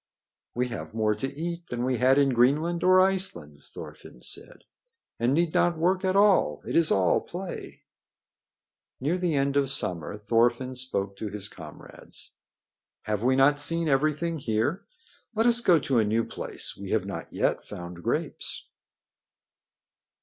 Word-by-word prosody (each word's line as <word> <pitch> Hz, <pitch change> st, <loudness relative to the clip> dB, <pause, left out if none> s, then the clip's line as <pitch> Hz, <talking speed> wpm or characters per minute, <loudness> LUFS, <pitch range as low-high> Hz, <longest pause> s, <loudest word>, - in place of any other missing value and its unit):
"We 125 Hz, +1 st, 0 dB
have 115 Hz, -, -7 dB
more 110 Hz, -1 st, +2 dB
to 135 Hz, +6 st, -4 dB
eat 170 Hz, +4 st, -5 dB
than 120 Hz, 0 st, -3 dB
we 130 Hz, -1 st, 0 dB
had 130 Hz, +3 st, +4 dB
in 140 Hz, -1 st, +4 dB
Greenland 145 Hz, +8 st, +2 dB
or 185 Hz, 0 st, +6 dB
Iceland," 190 Hz, 0 st, +1 dB
Thorfinn -, -, -11 dB
said, -, -, -4 dB, 0.6 s
"and 120 Hz, +2 st, +2 dB
need 165 Hz, +3 st, +1 dB
not 175 Hz, -1 st, +2 dB
work 185 Hz, +3 st, +1 dB
at 190 Hz, 0 st, +1 dB
all. 200 Hz, -1 st, +3 dB
It -, -, -3 dB
is 165 Hz, -1 st, +4 dB
all 95 Hz, -3 st, +3 dB
play." 180 Hz, +1 st, -8 dB, 1.2 s
Near 155 Hz, +8 st, -1 dB
the 175 Hz, -4 st, 0 dB
end 140 Hz, 0 st, +1 dB
of 140 Hz, -2 st, +2 dB
summer 90 Hz, -, -1 dB
Thorfinn 120 Hz, +4 st, +1 dB
spoke 100 Hz, -6 st, -3 dB
to 110 Hz, -, -4 dB
his 105 Hz, 0 st, -4 dB
comrades. 80 Hz, -6 st, -10 dB, 0.7 s
"Have 105 Hz, -1 st, -2 dB
we 130 Hz, +2 st, +3 dB
not 140 Hz, +2 st, +4 dB
seen 165 Hz, +2 st, +2 dB
everything 155 Hz, +3 st, +1 dB
here? 140 Hz, -, -1 dB, 0.5 s
Let 225 Hz, +1 st, +2 dB
us 240 Hz, 0 st, +4 dB
go 180 Hz, -7 st, +5 dB
to 135 Hz, -4 st, +1 dB
a -, -, +4 dB
new 110 Hz, +2 st, +1 dB
place. -, -, -4 dB
We -, -, -8 dB
have -, -, 0 dB
not -, -, -6 dB
yet -, -, 0 dB
found 85 Hz, 0 st, -9 dB
grapes." -, -, -3 dB
135 Hz, 155 wpm, -27 LUFS, 115-170 Hz, 1.2 s, or